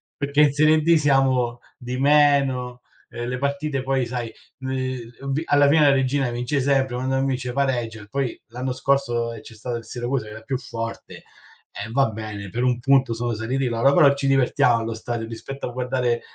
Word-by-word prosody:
perché 140 +1 +1
in 145 -2 +5
serie 155 +1 +4
D 170 +2 +4
siamo 135 -5 +2 0.2
di 125 +1 -5
meno, 135 -3 +3 0.3
ehm, 120 0 -5
le 125 0 -2
partite 140 0 -2
poi, 135 -2 0
sai, 120 -1 -4 0.3
l 130 -1 -3 0.2
ubi 140 +3 -2
alla 145 0 +4
fine 155 +1 +4
la - - +6
Reggina 135 -1 +1
vince 125 +4 -1
sempre, 135 -2 +1
quando 130 +1 -1
non 135 0 +1
vince 125 -2 -2
pareggia, 120 -5 -1
e 105 - -13
poi, 135 -1 -2
l'anno 125 +3 -4
scorso, 120 -3 0
ehm, 110 - -9
c'è 115 - -13
stato 120 +2 -5
il 115 - -10
Siracusa 120 -1 -3
che 105 - -10
era 110 +1 -9
più 130 +3 -3
forte, 115 -2 -7 0.5
e 110 - -7
va 135 -1 +2
bene, 105 -3 -7
per 120 +6 -2
1 125 -1 +2
punto 135 -2 +3
sono 120 +1 -2
saliti 125 +5 -1
loro, 120 +4 +2
però 145 -5 +6
ci 140 -1 -2
divertiamo 125 -3 +3
allo 115 0 -3
stadio 115 0 -4
rispetto 135 +5 -7
a - - -6
guardare, 125 -1 -1
130 Hz, 200 wpm, -23 LUFS, 120-140 Hz, 0.5 s, la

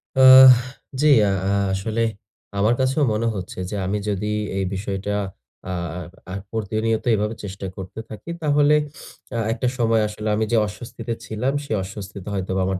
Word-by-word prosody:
আহ 130 0 +10 0.5
জি। 150 - +4 0.2
আ - - +1 0.2
আহ 100 0 +2
আসলে 110 +4 -2 0.6
আমার 105 +4 +3
কাছেও 130 +3 +1
মনে 115 +2 0
হচ্ছে 95 -1 -6
যে, - - -4
আমি 100 +2 -1
যদি 100 0 -2 0.3
এই 95 - 0
বিষয়টা 100 +1 -3 0.6
আ - - -2 0.3
আহ 90 - -6 0.3
আ - - -5 0.2
প্রতিনিয়ত 110 +1 -1
এভাবে 105 +2 -1
চেষ্টা 95 0 -6
করতে 95 +3 -7
থাকি, 110 +9 -9
তাহলে 145 -1 +4 0.6
আহ 115 - 0
একটা 125 +1 -2
সময় 115 -2 +3
আসলে 105 +1 -6
আমি 110 +1 +1
যে, 120 - +3
অস্বস্তিতে 115 +3 -6
ছিলাম, 110 +6 -1
সে - - -11
অস্বস্তিতে 100 -1 -8
হয়তোবা 95 -1 -1
আমার 95 0 -1
105 Hz, 165 wpm, -22 LUFS, 100-115 Hz, 0.6 s, আহ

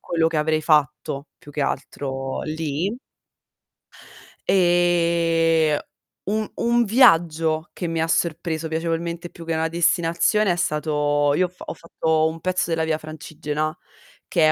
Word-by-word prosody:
quello 165 -1 0
che 165 - -1
avrei 155 0 +1
fatto 150 -2 +1
più 145 - -14
che 145 - -3
altro 135 -1 -3
lì 160 - -2 1.5
Ehm, 170 -3 +3 0.5
un 215 +1 -1
un 235 0 +2
viaggio 165 - +3
che 175 - -4
mi 165 -1 -1
ha 160 - +1
sorpreso 165 -1 -1
piacevolmente 170 +1 -3
più 165 -1 -12
che 165 - -1
una 160 0 0
destinazione 170 +4 +2
è - - +1
stato 150 -3 +1
io 185 - +3
ho - - -5
f 180 - -29
ho - - -5
fatto 160 -1 0
un 160 +1 -5
pezzo 185 -1 0
della 165 -1 0
Via 160 -1 0
Francigena 155 0 -4 0.5
che 165 -4 +3
è - - +5
165 Hz, 145 wpm, -23 LUFS, 155-170 Hz, 1.5 s, è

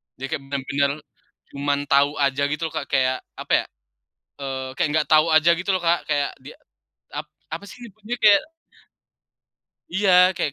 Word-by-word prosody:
Jadi 135 +1 -6
kayak 155 -3 -2
benar-benar 140 0 0 0.6
cuman 140 0 0
tau 140 +1 +3
aja 140 0 +1
gitu 150 +2 -3
loh - - -7
Kak, 140 - -3
kayak, 130 -1 +1 0.2
apa - - -4
ya, - - -12 0.8
eee, 130 -1 -4
kayak 145 - 0
nggak 155 -1 +1
tau 155 +1 +6
aja 155 +1 +5
gitu 180 +3 -4
loh 190 - +3
Kak, 170 +1 +3
kayak 145 -1 +1
dia - - -12 0.6
ap - - -6 0.2
apa 165 +5 -5
sih 245 - -12
nyebutnya 220 +2 -7
kayak 205 -2 +7 1.5
Iya, 185 -1 +4
kayak 155 -6 -1
150 Hz, 165 wpm, -23 LUFS, 140-180 Hz, 1.5 s, kayak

